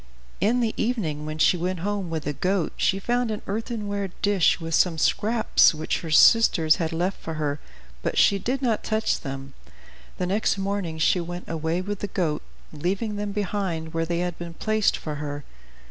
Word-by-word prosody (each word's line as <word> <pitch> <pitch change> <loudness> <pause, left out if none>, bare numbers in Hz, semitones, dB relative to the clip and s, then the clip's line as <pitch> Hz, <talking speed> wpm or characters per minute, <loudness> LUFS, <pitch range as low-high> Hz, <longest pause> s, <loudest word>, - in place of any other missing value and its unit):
In 230 +6 +2
the 225 -2 0
evening, 165 -11 -1
when 155 0 -4
she 170 +3 +4
went 180 0 -2
home 200 -2 -2
with 160 -2 -3
the 150 - -2
goat, 185 +3 0
she 195 - +1
found 240 +4 0
an 215 -1 -4
earthenware 205 -2 -3
dish 200 -4 +3
with 165 -1 -5
some 170 0 +3
scraps 215 +1 +3
which 155 - -2
her 165 - -7
sisters 160 -2 +6
had 165 -1 -1
left 175 +4 -2
for 160 - -5
her, 145 -1 -2 0.4
but - - -2
she 200 - +5
did 260 +6 -2
not 230 -4 +1
touch 220 0 0
them. 135 0 -7 0.6
The 180 - -1
next 200 +2 +1
morning 195 -4 -2
she 165 +3 +3
went 175 +1 -6
away 165 +2 -1
with 205 +1 -4
the 205 - -3
goat, 165 -6 -1 0.3
leaving 195 +7 -2
them 205 0 -3
behind 190 -5 -2
where 165 0 0
they 170 0 -1
had 175 -2 -3
been 170 -1 -7
placed 215 +1 +1
for 150 -2 -5
her. 145 -1 -5
180 Hz, 190 wpm, -25 LUFS, 160-205 Hz, 0.6 s, sisters